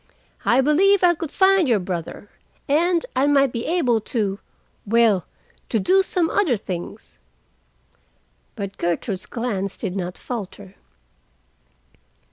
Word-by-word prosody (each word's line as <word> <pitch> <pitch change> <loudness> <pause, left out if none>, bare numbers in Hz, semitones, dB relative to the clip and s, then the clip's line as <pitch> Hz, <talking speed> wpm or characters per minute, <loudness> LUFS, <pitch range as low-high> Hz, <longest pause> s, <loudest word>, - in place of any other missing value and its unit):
I 245 +3 +4
believe 370 +8 +3
I 350 -1 +6
could 330 -2 -6
find 380 -4 +3
your 230 - +4
brother, 180 +1 -5 0.4
and 335 - +2
I 265 +2 +2
might 275 -2 +3
be 235 -1 -4
able 255 -10 +1
to—well, 210 -1 -1 0.4
to 225 - +1
do 375 - +4
some 360 -3 0
other 325 - +1
things." 180 -3 -8 1.4
But 200 -1 -6
Gertrude's 180 +3 -2
glance 205 -6 -3
did 195 -4 -4
not 180 -2 -4
falter. 205 -4 -7
235 Hz, 115 wpm, -22 LUFS, 195-325 Hz, 1.4 s, I